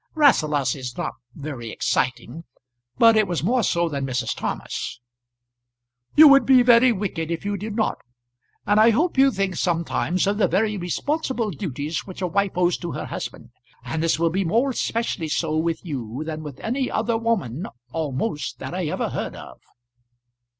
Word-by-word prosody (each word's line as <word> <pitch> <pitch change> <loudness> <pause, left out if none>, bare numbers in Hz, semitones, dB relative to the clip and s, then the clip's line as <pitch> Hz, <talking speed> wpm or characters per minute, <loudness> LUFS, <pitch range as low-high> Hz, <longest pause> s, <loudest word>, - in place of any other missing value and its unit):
Rasselas 155 - +3
is 125 -2 -7
not - - -3 0.2
very 140 -6 -6
exciting, 130 +6 -2 0.5
but 230 -1 +6
it 215 -2 +3
was 175 -3 -2
more 245 +7 +2
so 170 -4 +1
than 140 -4 -3
Mrs. 125 -3 -2
Thomas. - - -4 1.2
"You 310 0 +10
would 275 -2 +7
be 255 0 +6
very 245 +1 +6
wicked 185 -6 -3
if 170 +3 -4
you 205 0 -1
did 210 +2 -5
not. 220 - 0 0.7
And 205 +1 +3
I 220 +2 +7
hope 310 +11 +1
you 270 +1 +6
think 195 -6 -2
sometimes 170 +1 0
of 200 +2 0
the - - +4
very 210 +1 +1
responsible 235 - -2
duties 150 -2 -4
which 185 - -9
a - - +1
wife 200 +3 0
owes 180 0 +2
to 175 -2 -5
her - - -4
husband. - - -7 0.3
And 160 - -2
this 165 -1 +2
will 165 0 +1
be 190 +3 0
more 230 +10 +1
especially 230 -8 -2
so 155 0 -1
with 165 +2 -1
you 130 -3 -4
than 155 -1 -5
with 145 -4 -9
any 255 +3 -1
other 225 +2 0
woman 205 - -1 0.2
almost 150 - -3
that - - -7
I 180 -3 -2
ever 150 - -2
heard - - -4
of." - - -11
180 Hz, 175 wpm, -23 LUFS, 155-225 Hz, 1.2 s, You